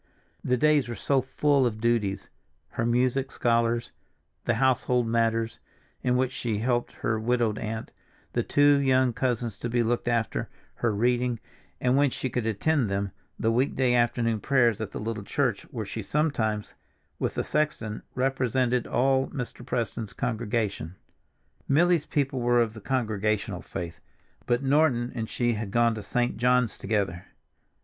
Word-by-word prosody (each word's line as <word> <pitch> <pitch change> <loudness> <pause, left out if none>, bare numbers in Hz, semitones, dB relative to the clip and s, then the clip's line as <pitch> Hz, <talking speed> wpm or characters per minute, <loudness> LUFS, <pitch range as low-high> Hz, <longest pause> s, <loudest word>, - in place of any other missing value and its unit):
The 125 - +1
days 150 -2 +3
were 120 - -3
so 135 +6 +1
full 135 +1 +2
of 110 -2 -4
duties; 110 -4 0 0.4
her 115 - -1
music 130 +3 +1
scholars, 115 -1 +1 0.5
the 120 - +2
household 125 -1 +2
matters, 115 0 0 0.4
in 125 0 +2
which 130 0 +1
she 115 -4 -2
helped 120 +2 0
her 110 0 -1
widowed 115 -1 +1
aunt, 110 0 -4 0.4
the - - +2
two 145 0 +4
young 130 -2 +3
cousins 120 -3 -1
to 120 - -4
be 120 0 +2
looked 120 +1 -1
after, 115 -3 0 0.3
her 115 - +1
reading, 120 +2 +1 0.4
and, 125 +1 +2
when 145 0 +4
she 130 0 -4
could 120 -2 -1
attend 120 +3 +1
them, 100 0 -1 0.3
the 115 - +2
weekday 130 +1 +2
afternoon 120 -2 +2
prayers 120 -4 +2
at 110 - -3
the - - -6
little 110 0 -3
church - - -1
where - - -4
she - - -5
sometimes, 110 -9 -1 0.5
with - - -1
the - - 0
sexton, 150 -8 -1
represented 125 -2 +1
all 135 +1 +2
Mr. 125 -2 -6
Preston's 115 -3 -3
congregation. 110 - -2 0.7
Milly's 165 +2 +3
people 135 -3 0
were 120 0 +3
of 115 -2 +1
the 110 - -10
Congregational 110 -5 -1
faith, 85 -3 -6 0.5
but 120 +2 +1
Norton 135 -4 +2
and 110 -2 -4
she 120 -1 +1
had 110 -2 -4
gone 120 +2 +3
to 110 - -5
St. 120 +3 -1
John's 125 0 +2
together. 95 -4 -2
120 Hz, 155 wpm, -27 LUFS, 110-130 Hz, 0.7 s, two